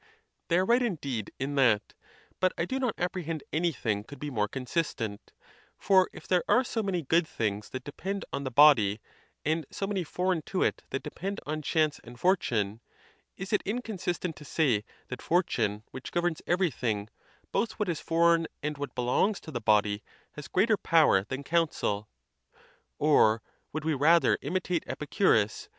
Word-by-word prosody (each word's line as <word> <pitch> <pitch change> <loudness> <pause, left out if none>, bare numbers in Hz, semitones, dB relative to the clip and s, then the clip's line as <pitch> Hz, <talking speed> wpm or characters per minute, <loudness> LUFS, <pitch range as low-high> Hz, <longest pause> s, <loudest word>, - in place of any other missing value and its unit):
They 170 - +3
are 185 - +3
right, 240 +4 +4
indeed, 140 - -2
in 135 +2 -3
that; 105 -5 +3 0.5
but 185 -1 +2
I 170 - 0
do 260 +7 -2
not 250 -5 0
ap 180 +1 -1
prehend 165 -4 -4
anything 140 -11 0
could 140 +6 -11
be 145 +1 -4
more 105 -4 0
consistent, 125 -4 -3 0.5
for 190 -2 +4
if - - -12
there 180 -1 +2
are 255 - +4
so 235 -2 -2
many 190 -5 -1
good 160 +4 +2
things 105 -5 -2
that 130 -1 -6
depend 195 +8 -5
on 140 - -2
the 130 - -2
body, 120 -7 +6 0.5
and 160 +2 +1
so 195 - -3
many 195 -2 -1
foreign 180 +1 -1
to 190 - 0
it - - 0
that 135 - -3
depend 195 +3 -5
on 155 +1 -3
chance 155 0 +1
and 120 0 -12
fortune, 115 - +1 0.6
is 195 +2 -5
it 210 - +3
inconsistent 190 -6 -3
to - - -11
say 135 -8 +1 0.3
that 125 - -6
fortune, 110 - 0
which 130 - -8
governs 175 -2 0
every 175 -1 +2
thing, 110 -4 -2 0.4
both 230 - 0
what 210 - -2
is 170 -3 -1
foreign 165 0 +3 0.2
and 150 -1 -3
what 145 - -5
belongs 125 - +1
to 160 - -9
the 120 -4 -4
body, 105 -1 +2 0.3
has 150 - -9
greater 210 +3 +3
power 155 - +4
than 135 +4 -5
counsel. 140 -11 0 0.9
Or 115 -7 +4 0.3
would 155 0 -4
we 160 - +2
rather 160 +5 +4
im - - -4
itate 180 -2 0
Epicurus? 145 - +1
155 Hz, 175 wpm, -29 LUFS, 125-180 Hz, 0.9 s, body